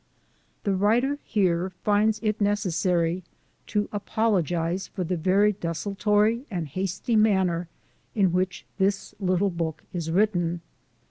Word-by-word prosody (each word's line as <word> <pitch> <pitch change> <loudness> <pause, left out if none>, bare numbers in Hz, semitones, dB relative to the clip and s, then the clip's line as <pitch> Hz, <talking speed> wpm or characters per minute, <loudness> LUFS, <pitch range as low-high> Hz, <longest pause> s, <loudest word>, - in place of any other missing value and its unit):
The 200 - +1
writer 235 +9 +2
here 185 -4 +1
finds 215 +1 +2
it 215 -1 0
necessary 180 -3 +1 0.5
to 210 -1 0
apologize 190 -4 0
for 185 - -4
the 180 +1 -1
very 190 +5 +3
desultory 205 - 0
and 175 -7 -3
hasty 190 - -2
manner 190 -5 +2 0.5
in 195 -5 +3
which 185 0 -1
this 195 +1 0
little 185 0 +1
book 165 -2 -3
is 170 -3 -3
written. 175 -2 +1
190 Hz, 120 wpm, -26 LUFS, 175-210 Hz, 0.5 s, very